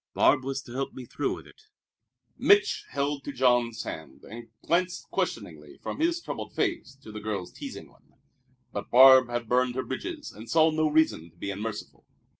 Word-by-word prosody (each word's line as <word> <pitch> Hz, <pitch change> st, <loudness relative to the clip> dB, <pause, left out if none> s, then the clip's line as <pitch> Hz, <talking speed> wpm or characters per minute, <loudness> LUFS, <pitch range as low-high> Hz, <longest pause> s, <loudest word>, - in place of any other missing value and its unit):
Barbe 130 Hz, -3 st, +4 dB
was 135 Hz, 0 st, -3 dB
to 120 Hz, -, -12 dB
help 135 Hz, +1 st, -3 dB
me 130 Hz, -, -8 dB
through -, -, -2 dB
with -, -, -12 dB
it." 435 Hz, -, -19 dB, 0.7 s
Mich' 410 Hz, +2 st, +3 dB
held 140 Hz, +1 st, -2 dB
to 145 Hz, -, -5 dB
Jean's 120 Hz, -3 st, +2 dB
hand, 80 Hz, -4 st, -8 dB
and 115 Hz, +2 st, -10 dB, 0.2 s
glanced 175 Hz, +2 st, 0 dB
questioningly -, -, -4 dB
from -, -, -6 dB
his 340 Hz, +2 st, +1 dB
troubled -, -, -7 dB
face 330 Hz, -, -2 dB
to 110 Hz, -, -10 dB
the 105 Hz, -, -7 dB
girl's 100 Hz, -4 st, -4 dB
teasing -, -, -8 dB
one. -, -, -27 dB, 0.6 s
But -, -, -5 dB
Barbe 130 Hz, 0 st, +8 dB
had 120 Hz, -1 st, -3 dB
burned 125 Hz, +1 st, +2 dB
her 130 Hz, -, -1 dB
bridges 300 Hz, -, -5 dB
and 110 Hz, +2 st, -12 dB
saw 160 Hz, 0 st, +4 dB
no 155 Hz, 0 st, +1 dB
reason 150 Hz, -, +2 dB
to 85 Hz, -, -29 dB
be 100 Hz, -, -4 dB
unmerciful. 105 Hz, +2 st, -6 dB
130 Hz, 185 wpm, -27 LUFS, 115-155 Hz, 0.7 s, Barbe